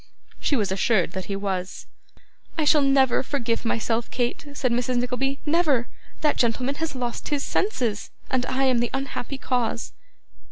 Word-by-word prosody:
She 290 - +1
was 205 -6 0
assured 190 -2 +2
that 190 0 -4
he 200 - -3
was. 190 -2 -3 0.7
'I 315 - +2
shall 300 0 +5
never 270 -2 +4
forgive 240 -4 -1
myself, 230 0 0
Kate,' 245 +4 -2
said 255 -3 0
Mrs. 245 +1 +1
Nickleby. 255 +3 0
'Never! 295 -6 +2 0.3
That 300 -1 +2
gentleman 250 +3 +1
has 325 -4 -2
lost 245 -2 -3
his 290 -2 0
senses, 240 - -1 0.2
and 255 -1 +2
I 260 +1 0
am 255 -3 +4
the 240 0 +1
unhappy 270 0 -4
cause. 250 -3 -1
250 Hz, 160 wpm, -25 LUFS, 230-275 Hz, 0.7 s, shall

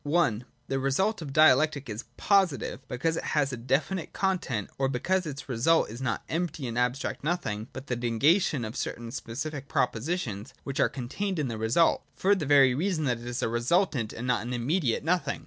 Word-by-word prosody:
(i) 120 -11 +3 0.3
The 135 - -1
result 175 +11 +1
of 145 -4 -6
Dialectic 150 -1 +4
is 110 +3 -5
positive, 190 - +2
because 160 +7 -1
it - - -3
has 140 -3 0
a - - -1
definite 135 +9 -1
content, 175 - -1
or 135 -1 +2
because 180 +8 0
its 140 -2 -6
result 130 +3 +2
is 120 +3 -8
not 115 -6 -1
empty 165 -4 -2
and 115 - -4
abstract 125 +3 -1
nothing, 140 -10 -2
but 130 - -8
the 125 - -2
negation 125 - +2
of 110 - -6
certain 115 -1 -4
specific 140 +4 -5
propositions 120 - -2
which 140 - -4
are - - +4
contained 180 +10 -3
in 145 -5 -1
the 115 - -4
result, 120 +10 +3
— - - -38
for 200 +2 +3
the 180 -8 -1
very 135 -3 +6
reason 165 +3 0
that 125 -5 0
it 120 - -9
is 120 0 -3
a - - +2
resultant 120 - +1
and 115 - -6
not 125 -3 +1
an 120 +3 -4
immediate 125 +1 0
no 175 +4 +3
thing. - - -4
135 Hz, 200 wpm, -28 LUFS, 120-165 Hz, 0.3 s, very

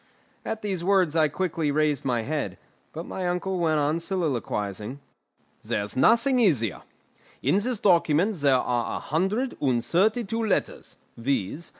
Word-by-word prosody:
At 220 -1 -4
these 190 -4 -2
words 185 -4 +2
I 155 -2 +4
quickly 165 -1 -2
raised 150 -1 +1
my 120 -3 0
head; 150 +3 -3 0.3
but 165 +2 -6
my 185 -1 -4
uncle 180 +1 -1
went 160 -2 +2
on 150 +3 +1
soliloquising. 130 - -3 0.6
"There's 105 0 -3
nothing 235 - +4
easier. 140 - +2 0.6
In 195 - +3
this 240 +3 -2
document 175 +1 +3
there 140 -3 +3
are 120 -2 0
a - - -3
hundred 195 - -1
and 125 -5 +1
thirty 215 +7 +2
two 225 +2 -2
letters, 215 - -2 0.2
viz. 135 - -2
165 Hz, 150 wpm, -26 LUFS, 140-195 Hz, 0.6 s, I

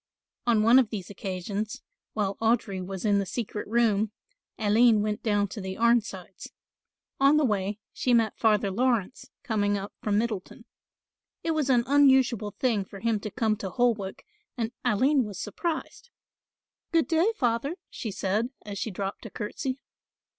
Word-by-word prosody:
On 225 -3 +4
one 235 +4 +7
of 245 -5 +2
these 200 -4 -6
occasions, 200 +2 -4 0.3
while 200 -2 -1
Audry 220 -4 0
was 190 +2 -5
in 205 -1 +3
the 200 - -1
secret 210 +1 -4
room, 220 -2 +2 0.5
Aline 220 0 +4
went 210 0 -2
down 205 -2 +1
to 205 - -6
the 190 0 -5
Arnsides. 220 -6 0 0.7
On 275 +2 +5
the 305 - +3
way 205 -2 -1 0.2
she 250 - 0
met 230 -2 +3
Father 210 -3 +2
Laurence 240 0 0
coming 205 -5 +1
up 200 +1 -6
from 205 -1 +1
Middleton. 215 -4 -3 0.8
It 330 - 0
was 305 -4 0
an 245 -2 +4
unusual 265 -6 +4
thing 220 -1 0
for 195 +1 -11
him 225 -2 +1
to 215 - -5
come 215 +1 0
to 195 -2 -4
Holwick 220 -4 0 0.3
and 230 -1 -1
Aline 255 +4 +3
was 205 -4 -7
surprised. 330 - -4 0.8
"Good 330 -1 +3
day, 340 +6 +3
Father," 245 - 0 0.2
she 225 - -5
said, 205 +4 -1 0.2
as 200 -2 -5
she - - -2
dropped 195 +3 -5
a - - -10
curtsey. 255 +6 -4
220 Hz, 160 wpm, -27 LUFS, 200-245 Hz, 0.8 s, one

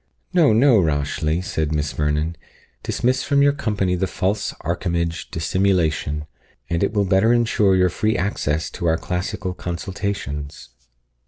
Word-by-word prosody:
"No, 165 -8 +5
no, 115 +1 +5
Rashleigh," 75 +1 0
said 80 -4 -2
Miss 75 -1 -1
Vernon; 75 +2 0 0.5
"dismiss 130 +1 0
from 140 -1 +2
your 140 0 +4
company 105 -10 -1
the 95 +1 0
false 100 +3 -1
archimage 85 0 -2
Dissimulation, 80 -3 0 0.5
and 85 +1 +1
it 100 - +1
will 105 -2 +1
better 95 +5 +3
ensure 110 -5 +3
your 90 -1 +4
free 110 +5 0
access 80 -5 -1
to 85 - -3
our 80 0 +3
classical 90 +2 -3
consultations." 85 -6 -5
90 Hz, 140 wpm, -21 LUFS, 80-105 Hz, 0.5 s, No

